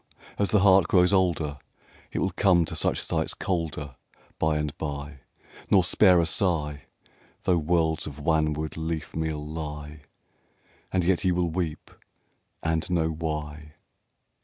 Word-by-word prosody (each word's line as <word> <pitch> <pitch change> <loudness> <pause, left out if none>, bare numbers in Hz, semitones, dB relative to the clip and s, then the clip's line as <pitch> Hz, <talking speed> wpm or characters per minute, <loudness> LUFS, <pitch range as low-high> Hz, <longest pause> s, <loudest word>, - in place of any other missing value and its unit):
is 100 - +2
the 105 - +3
heart 95 -3 +6
grows 90 +1 +4
older 85 -6 +1 0.5
It - - -5
will - - 0
come 90 -4 +3
to - - -6
such - - +1
sights - - -1
colder 80 -7 -3 0.4
By 80 -1 +2
and 75 -1 -3
by, 70 -1 -5 0.5
nor 95 -3 +5
spare 90 +1 +5
a 85 - +2
sigh 75 -5 0 0.6
Though 90 -2 +2
worlds 80 0 +1
of 75 -1 -8
wanwood 80 0 0
leafmeal 80 -1 -3
lie; 75 -1 -6 0.9
And 90 -2 +1
yet 90 -1 +2
you 90 -2 +2
will 85 -2 0
weep 80 -2 -4 0.7
and 80 +1 0
know 85 -2 +1
why. 75 -1 -5
80 Hz, 135 wpm, -26 LUFS, 75-90 Hz, 0.9 s, heart